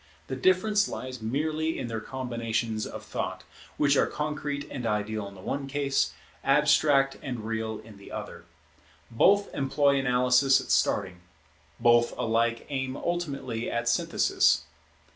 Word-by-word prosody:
The 130 - -2
difference 195 +8 +3
lies 130 -2 -6
merely 155 +7 -1
in - - -3
their 115 -1 -3
combinations 115 -3 -3
of - - -8
thought, - - -4 0.3
which 145 -1 +3
are - - +3
concrete 150 -1 -3
and 125 -4 -3
ideal 105 -1 -2
in 100 - -11
the 95 - -12
one 135 +7 -3
case, 140 0 0 0.3
abstract 135 -2 +4
and 125 -6 -5
real 110 -1 -3
in 110 -2 -14
the 100 - -13
other. - - -7 0.7
Both 200 - +3
employ 140 0 +2
analysis 125 +1 +4
at - - -5
starting; 90 -3 +1 0.6
both 120 0 +4
alike 115 +1 0
aim 130 -1 -3
ultimately 140 -9 -3
at 120 0 -2
synthesis. 75 -9 +2
130 Hz, 140 wpm, -27 LUFS, 115-140 Hz, 0.7 s, abstract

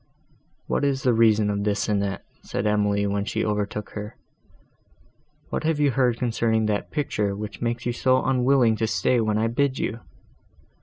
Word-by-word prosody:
"What - - -1
is 135 -1 0
the 125 - +3
reason 110 -2 +3
of 100 0 -2
this, 105 0 0
Annette?" 100 -2 -1 0.2
said 100 - -4
Emily, 105 -1 +1
when 100 0 -1
she 105 - -2
overtook 105 0 -2
her, 105 +1 -7 1.3
"what - - -3
have 160 -1 0
you 145 -2 +3
heard 125 -2 +1
concerning 115 -2 0
that 105 -1 -1
picture, 105 -9 -1
which 105 -2 -7
makes 120 0 -2
you 120 - 0
so 130 +1 +2
unwilling 130 -3 +3
to 110 - 0
stay 120 +2 +1
when 110 -1 0
I 110 - +1
bid 130 +4 0
you?" 115 - -3
110 Hz, 170 wpm, -24 LUFS, 105-125 Hz, 1.3 s, the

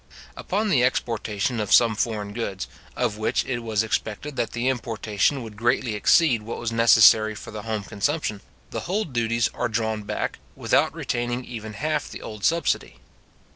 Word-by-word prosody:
Upon 210 +3 -1
the 135 -10 +4
exportation 115 -2 -1
of 105 -2 -2
some 115 -2 +6
foreign 105 -2 -2
goods, 100 -4 -4 0.3
of 105 - -1
which 110 - 0
it 125 -2 -2
was 110 -2 0
expected 110 +5 -3
that 115 - -2
the 120 +2 -1
importation 115 0 0
would 110 -2 -9
greatly 120 +1 +1
exceed 120 +3 +4
what 115 +2 -6
was 115 -1 -3
necessary 110 -1 +6
for - - -9
the 105 -1 -6
home 110 -1 -3
consumption, 105 +1 -2 0.3
the - - -3
whole 210 +4 0
duties 120 -4 0
are - - -1
drawn 110 -1 -1
back, 105 - -3 0.2
without - - +2
retaining 120 +1 -2
even 110 -2 -7
half 150 +6 -2
the - - -9
old 105 -2 -8
subsidy. 165 - +1
115 Hz, 170 wpm, -24 LUFS, 110-125 Hz, 0.3 s, some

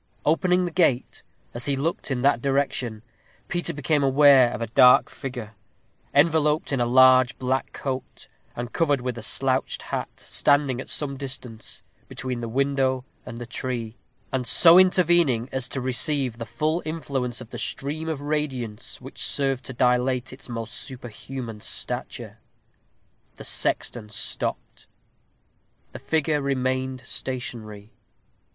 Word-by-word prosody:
Opening 180 +4 +2
the 175 - -3
gate, 160 -8 +1 0.3
as 120 0 -3
he 140 - +1
looked 150 +5 -2
in 130 -2 -2
that 140 -4 +3
direction, 135 -5 -1 0.5
Peter 175 0 0
became 150 +1 0
aware 135 -2 +6
of - - -5
a 115 - -2
dark 125 +3 +5
figure, 120 -5 -7 0.6
enveloped 150 +2 +2
in 135 - +1
a 120 - +1
large 130 +1 +5
black 130 +1 -1
cloak, 130 -2 -6 0.3
and 120 0 -6
covered 145 -5 +1
with 125 -1 -3
a 115 - -7
slouched 130 +3 +2
hat, - - -4
standing 140 -3 +1
at - - -9
some 140 -2 0
distance, 130 -4 -6 0.2
between 130 -2 -4
the 115 - -4
window 130 0 0 0.2
and 115 - -7
the 120 - -6
tree, 120 -2 -4 0.4
and 130 -2 -2
so 170 +1 +8
intervening 175 -10 +3
as 130 -2 0
to 135 - -3
receive 130 0 +1
the 115 - -5
full 155 +9 -1
influence 135 -7 -3
of 115 - -11
the - - -6
stream 155 +4 -3
of 155 -3 -3
radiance 140 -7 -3
which - - -4
served 135 -2 +1
to - - -4
dilate 125 +1 +1
its 130 - -10
almost 115 -1 -5
superhuman 120 -2 -7
stature. - - -4 1.0
The - - -10
sexton 110 -3 -1
stopped. 105 - -4 1.0
The - - -9
figure 155 -1 0
remained 130 -1 -1
stationary. 110 -6 -5
130 Hz, 140 wpm, -24 LUFS, 120-145 Hz, 1.0 s, so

